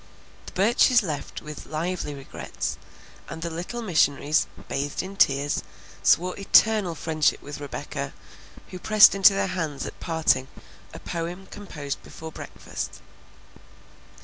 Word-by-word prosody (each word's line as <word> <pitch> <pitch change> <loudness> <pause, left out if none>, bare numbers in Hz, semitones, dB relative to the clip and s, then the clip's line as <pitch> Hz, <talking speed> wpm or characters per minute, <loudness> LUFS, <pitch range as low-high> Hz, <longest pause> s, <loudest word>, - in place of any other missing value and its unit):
The - - -7
Burches 240 +4 +4
left 150 -6 -5
with 150 -1 -8
lively 160 -1 -3
regrets, 135 -1 -5 0.5
and 160 - -6
the 170 - -3
little 180 +9 -5
missionaries, 155 -5 +2 0.2
bathed 140 +4 -2
in 190 +1 -8
tears, 145 -5 +2 0.4
swore 180 +2 +3
eternal 200 -2 +4
friendship 155 -1 +1
with 145 0 -8
Rebecca, 145 -2 -5 0.6
who 185 - -8
pressed 215 +1 +7
into 195 0 +7
their 195 - +1
hands 155 -6 -3
at - - -8
parting 160 -5 +1 0.4
a - - -9
poem 175 +2 -5
composed 150 -9 -6
before 160 0 -9
breakfast. - - -7
165 Hz, 125 wpm, -25 LUFS, 145-195 Hz, 0.6 s, pressed